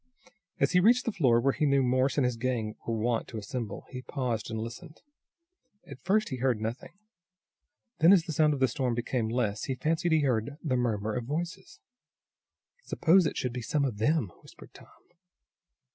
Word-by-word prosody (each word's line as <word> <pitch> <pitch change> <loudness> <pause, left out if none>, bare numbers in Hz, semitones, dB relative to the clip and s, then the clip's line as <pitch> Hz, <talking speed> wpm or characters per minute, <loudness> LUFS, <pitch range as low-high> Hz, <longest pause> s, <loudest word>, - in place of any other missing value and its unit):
As - - +2
he 180 - +4
reached 240 +6 +4
the 230 - 0
floor 125 - +3
where 135 +3 +2
he 150 - 0
knew 140 -1 +3
Morse 130 +3 +1
and 140 - +3
his 125 -1 0
gang 115 -3 -2
were 115 -1 -1
wont 115 +1 -1
to 115 - -7
assemble, 110 -1 -5
he 125 -1 -6
paused 125 -5 -3
and 110 -1 -4
listened. 125 +9 -8 0.9
At - - -11
first 215 +4 +1
he 130 - -4
heard 125 -3 +1
nothing, 115 - -6 1.0
then, 165 +3 +7
as 190 -4 +6
the 160 - -5
sound 150 -1 +3
of - - -6
the 130 - +4
storm 125 0 -1
became 120 -1 -2
less 110 -4 -1
he 130 - -2
fancied 160 +6 0
he 160 - +4
heard 130 +1 -1
the 140 -6 0
murmur 110 -4 -1
of 120 0 -3
voices. 175 +7 -5 1.0
"Suppose 175 +1 +3
it - - -4
should 125 -2 -2
be 125 - -4
some 140 +5 0
of 115 -6 -4
them?" 125 - +1
whispered - - -16
Tom. - - -15
130 Hz, 190 wpm, -29 LUFS, 115-155 Hz, 1.0 s, then